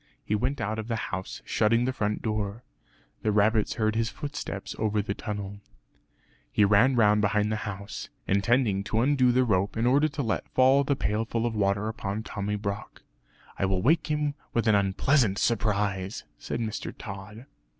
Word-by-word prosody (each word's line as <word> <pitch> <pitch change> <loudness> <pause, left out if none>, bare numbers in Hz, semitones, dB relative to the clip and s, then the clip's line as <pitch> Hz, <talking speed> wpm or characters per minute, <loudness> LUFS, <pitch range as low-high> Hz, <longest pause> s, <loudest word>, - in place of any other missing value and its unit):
He - - -1
went 125 +6 0
out 110 0 -2
of 110 - -5
the 115 - -1
house, 95 -3 -5
shutting 115 +3 +2
the 130 - 0
front 105 -3 -2
door. 105 +1 -2 0.6
The 110 - +1
rabbits 105 +1 +2
heard 110 -1 +1
his 115 0 +1
footsteps 145 -9 -6
over 110 -1 +1
the 100 0 -1
tunnel. 100 -1 -5 0.9
He 105 - +4
ran 105 +6 +4
round 105 -2 +4
behind 105 +1 +1
the - - +1
house, 100 0 -7 0.2
intending 100 0 +2
to 110 +1 +1
undo 130 -1 +4
the 130 +1 +3
rope 100 -3 0
in 115 - +1
order 140 +5 +4
to 145 -1 -4
let 115 - -2
fall 130 +2 +4
the 140 0 +1
pailful 115 0 -1
of 120 - -1
water 100 0 +1
upon 110 -1 -3
Tommy 105 -1 -3
Brock 100 0 -5 0.6
"I - - +2
will 95 -1 0
wake 160 +6 +3
him 150 -1 +1
up - - -5 0.2
with 115 -1 +1
an 110 - +5
unpleasant 100 +3 +2
surprise," 100 -4 0 0.2
said - - -4
Mr. 110 -1 -3
Tod. 105 +4 -8
110 Hz, 180 wpm, -27 LUFS, 100-120 Hz, 0.9 s, an